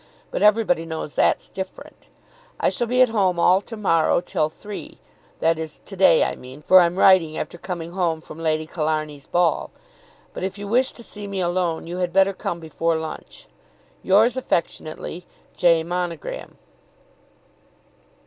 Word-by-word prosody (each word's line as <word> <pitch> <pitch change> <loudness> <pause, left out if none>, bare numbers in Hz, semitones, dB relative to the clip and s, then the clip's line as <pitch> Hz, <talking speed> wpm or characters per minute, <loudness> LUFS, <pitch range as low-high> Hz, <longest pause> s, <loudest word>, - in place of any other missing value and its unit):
But - - -3
everybody 210 -6 +3
knows 160 -2 -5
that's - - +2
different. 190 -1 -9 0.5
I - - +3
shall 240 - -1
be 250 +2 +5
at 250 - +2
home 195 -5 +1
all 185 +3 +4
to 225 +2 -9
morrow 165 -7 +2
till 155 -3 -1
three, 205 +6 -9 0.4
that 165 0 +2
is 160 -2 -6
to 195 - -9
day 180 -4 +5
I - - -1
mean, 130 +4 -12
for 185 +4 +7
I'm 175 0 +3
writing 180 -5 +4
after 175 - -5
coming 170 -2 -5
home 175 -3 0
from 160 0 -12
Lady 155 -1 0
Killarney's 155 -3 -3
ball; 175 -2 +1 0.6
but - - -6
if 190 +2 -3
you 205 0 -6
wish 250 +5 +2
to 235 - -11
see 205 -2 -8
me 200 -1 -4
alone 175 -2 -1
you 175 +2 -5
had 180 -1 -2
better 195 +1 +4
come 170 -2 -4
before 165 +1 -1
lunch. 160 -1 -8 0.6
Yours 220 +6 +4
affectionately, 170 -6 -3 0.3
J. 170 -2 +4
MONOGRAM. 175 -2 -5
175 Hz, 160 wpm, -22 LUFS, 160-195 Hz, 0.6 s, for